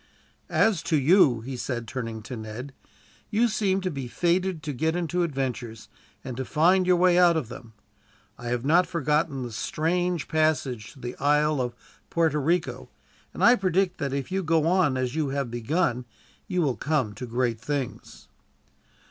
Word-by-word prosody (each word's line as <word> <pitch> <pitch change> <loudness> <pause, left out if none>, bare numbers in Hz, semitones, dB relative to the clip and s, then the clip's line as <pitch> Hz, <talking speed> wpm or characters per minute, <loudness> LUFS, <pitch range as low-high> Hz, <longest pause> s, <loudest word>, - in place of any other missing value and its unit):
"As 210 -7 +2
to 160 - +3
you," 140 - +4
he 130 +3 -6
said, 120 -1 -4
turning 115 -4 -5
to 125 - -7
Ned, 115 +5 -7 0.6
"you 230 +2 +3
seem 200 -3 0
to 185 -1 -2
be 135 -4 -5
fated 175 +4 0
to 150 - -3
get 160 +5 0
into 175 0 -1
adventures, 130 -7 -3 0.3
and 130 -2 -6
to 130 - -2
find 180 +6 +3
your 180 - +5
way 180 0 +4
out 175 -2 +5
of 130 -8 -3
them. 120 -2 -11 0.6
I 120 - -9
have 120 +1 -2
not 175 +4 +4
forgotten 150 -4 0
the 120 - -6
strange 170 +8 -1
passage 145 -8 0
in 135 - -15
the 120 - -5
Island 150 0 +2
of 120 -1 -3 0.3
Puerta 160 -3 +1
Rico; 165 +4 -1 0.4
and - - -4
I 240 - +8
predict 190 -3 0
that, 140 -3 -2
if 140 +4 -3
you 190 +1 0
go 160 -2 +2
on 170 -6 +2
as 130 -1 -1
you 155 -2 -1
have 135 -3 -2
begun, 125 +1 -1 0.4
you 180 -2 0
will 135 -5 0
come 140 -8 0
to 125 +5 -7
great 120 -1 -1
things." 140 -2 -5
150 Hz, 175 wpm, -26 LUFS, 125-175 Hz, 0.6 s, I